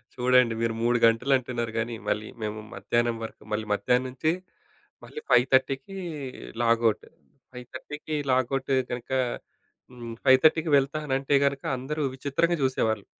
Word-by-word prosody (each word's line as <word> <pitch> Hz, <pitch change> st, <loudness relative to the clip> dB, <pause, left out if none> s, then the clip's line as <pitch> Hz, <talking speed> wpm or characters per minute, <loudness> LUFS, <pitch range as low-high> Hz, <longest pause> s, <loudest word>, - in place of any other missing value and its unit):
చూడండి 125 Hz, -1 st, +4 dB
మీరు 115 Hz, -1 st, 0 dB
3 120 Hz, +1 st, +3 dB
గంటలు 115 Hz, +4 st, +3 dB
అంటున్నారు 120 Hz, -2 st, -4 dB
గాని, 115 Hz, +1 st, -2 dB
మళ్ళీ 110 Hz, 0 st, -1 dB
మేము 110 Hz, 0 st, -3 dB
మధ్యాహ్నం 120 Hz, 0 st, 0 dB
వరకు, 110 Hz, -, -8 dB
మళ్ళీ 110 Hz, +1 st, -1 dB
మధ్యాహ్నం 125 Hz, +4 st, +1 dB
నుంచి 130 Hz, +5 st, 0 dB, 0.7 s
మళ్ళీ 455 Hz, -, -8 dB
5:30కి 135 Hz, +6 st, +3 dB, 0.7 s
లాగౌట్. 115 Hz, -1 st, +2 dB, 0.5 s
5:30కి 130 Hz, +5 st, -7 dB, 0.2 s
లాగౌట్ 130 Hz, +1 st, 0 dB, 0.2 s
గనుక 120 Hz, +1 st, -6 dB, 0.8 s
హ్మ్. 120 Hz, -2 st, -8 dB
5:30కి 155 Hz, +4 st, +5 dB
వెళ్తా 140 Hz, +3 st, 0 dB
అనంటే 135 Hz, +1 st, +1 dB
గనక 140 Hz, 0 st, -1 dB
అందరూ 150 Hz, +4 st, -3 dB
విచిత్రంగా 145 Hz, +6 st, 0 dB
జూసేవాళ్ళు. 110 Hz, -6 st, 0 dB
125 Hz, 125 wpm, -26 LUFS, 115-135 Hz, 0.8 s, 5:30కి